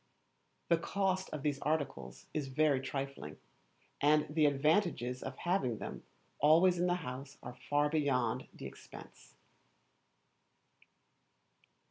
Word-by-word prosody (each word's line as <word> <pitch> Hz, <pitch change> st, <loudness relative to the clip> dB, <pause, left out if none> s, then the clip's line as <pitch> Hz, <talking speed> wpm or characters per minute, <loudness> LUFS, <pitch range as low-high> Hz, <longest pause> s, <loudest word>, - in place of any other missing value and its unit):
The 170 Hz, -1 st, +4 dB
Cost 190 Hz, +1 st, -1 dB
of 150 Hz, -2 st, -6 dB
these 145 Hz, -2 st, 0 dB
articles 140 Hz, -, -3 dB
is 150 Hz, -3 st, -2 dB
very 140 Hz, 0 st, +2 dB
trifling, 135 Hz, -, -5 dB, 0.6 s
and 150 Hz, +1 st, +4 dB
the 155 Hz, -1 st, +4 dB
advantages 145 Hz, -, +1 dB
of 130 Hz, 0 st, -6 dB
having 175 Hz, -, 0 dB
them -, -, -6 dB, 0.4 s
always 170 Hz, +5 st, +5 dB
in 180 Hz, -, +2 dB
the 175 Hz, -, +2 dB
house 130 Hz, +2 st, -7 dB
are 125 Hz, +1 st, -9 dB
far 145 Hz, 0 st, +3 dB
beyond 140 Hz, -7 st, 0 dB
the -, -, -10 dB
expense. -, -, -12 dB
145 Hz, 115 wpm, -34 LUFS, 130-160 Hz, 0.6 s, always